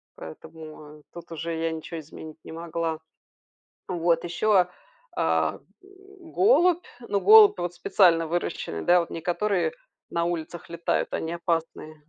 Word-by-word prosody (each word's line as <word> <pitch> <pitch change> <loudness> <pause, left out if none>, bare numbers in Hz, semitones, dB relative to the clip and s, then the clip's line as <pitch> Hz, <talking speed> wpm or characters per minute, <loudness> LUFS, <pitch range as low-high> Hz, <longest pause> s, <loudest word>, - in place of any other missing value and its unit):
Поэтому, 155 - -11
а, - - -19
тут 170 -1 -11
уже 165 0 -4
я 165 0 -1
ничего 160 +1 -6
изменить 155 +1 -11
не - - -11
могла. 165 -1 -4 0.9
Вот 170 -2 0
еще, 175 +5 -3
а, 180 0 +1 0.5
а, - - 0 0.2
голубь. 375 -1 0
Ну, 205 -4 -2
голубь 430 - +8
вот 175 0 -3
специально 170 -2 +3
выращенный, 165 - -3
да, 175 0 +5
вот 170 - -3
не 165 - -6
которые 195 - 0 0.4
на 170 0 0
улицах 170 -1 -5
летают, 170 0 -2
они 165 +1 -3
опасные. 165 -2 -3
170 Hz, 140 wpm, -25 LUFS, 160-190 Hz, 0.9 s, голубь